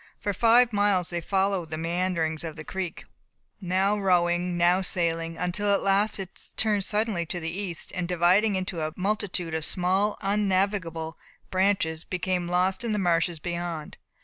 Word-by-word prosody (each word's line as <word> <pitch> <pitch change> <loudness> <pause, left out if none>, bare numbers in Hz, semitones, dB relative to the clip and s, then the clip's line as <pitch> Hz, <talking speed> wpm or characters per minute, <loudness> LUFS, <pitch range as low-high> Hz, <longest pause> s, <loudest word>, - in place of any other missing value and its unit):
For 205 - -2
five 235 +3 +4
miles 200 -4 +2
they 170 -1 -2
followed 190 -1 0
the 155 - -4
meanderings 165 -1 -1
of 160 -2 -5
the 155 - -8
creek, 185 0 -5 0.6
now 190 +3 +1
rowing, 175 -2 +2
now 175 +2 +4
sailing, 165 -2 -1
until 185 +4 0
at 200 - +2
last 200 +2 +3
it 190 -2 -8
turned 210 -2 +1
suddenly 210 -4 0
to 175 - -3
the 165 0 -4
east, 180 -2 -4
and 180 -2 -2
dividing 180 +4 +3
into 185 -3 -2
a 155 0 -2
multitude 185 -4 -2
of 160 -1 -1
small 190 +5 +1
innavigable 195 -5 0 0.3
branches 185 -4 +1
became 180 -1 -2
lost 185 +4 +1
in 230 -2 -1
the - - 0
marshes 170 -3 +1
beyond. 170 -2 -5
180 Hz, 160 wpm, -26 LUFS, 170-200 Hz, 0.6 s, five